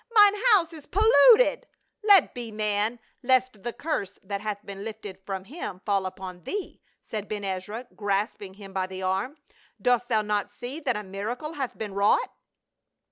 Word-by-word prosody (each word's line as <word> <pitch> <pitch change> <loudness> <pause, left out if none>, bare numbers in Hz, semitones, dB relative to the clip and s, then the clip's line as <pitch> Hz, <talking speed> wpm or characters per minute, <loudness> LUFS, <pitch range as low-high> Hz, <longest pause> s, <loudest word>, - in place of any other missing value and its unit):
" - - -43
Mine 410 -1 +8 0.2
house 340 -5 +3
is 305 -3 -11
polluted 470 +4 +6
!" - - -46
" - - -53
Let 390 -6 +7
be, 240 -2 -6
man, 210 +2 0 0.2
lest 255 -4 +2
the 240 - -3
curse 225 - -3
that 200 0 -4
hath 210 -1 -4
been 200 0 -7
lifted 210 -3 -7
from 190 -1 -3
him 205 - -6
fall 195 -2 +1
upon 185 -1 -8
thee," 405 - -5 0.2
said 210 -2 -5
Ben 210 -1 -4
Ezra, 195 +5 -4
grasping 200 -1 -2
him 195 -1 -11
by 190 -1 -1
the 190 0 -7
arm. 190 +10 -1 0.3
" - - -33
Dost 245 +3 +2
thou 220 -3 +2
not 210 -1 -1
see 255 +5 -7
that 265 -6 0
a 210 - -5
miracle 220 +10 -5
hath 270 -5 -4
been 210 -3 -5
wrought 200 +1 +3
215 Hz, 190 wpm, -26 LUFS, 195-255 Hz, 0.3 s, Mine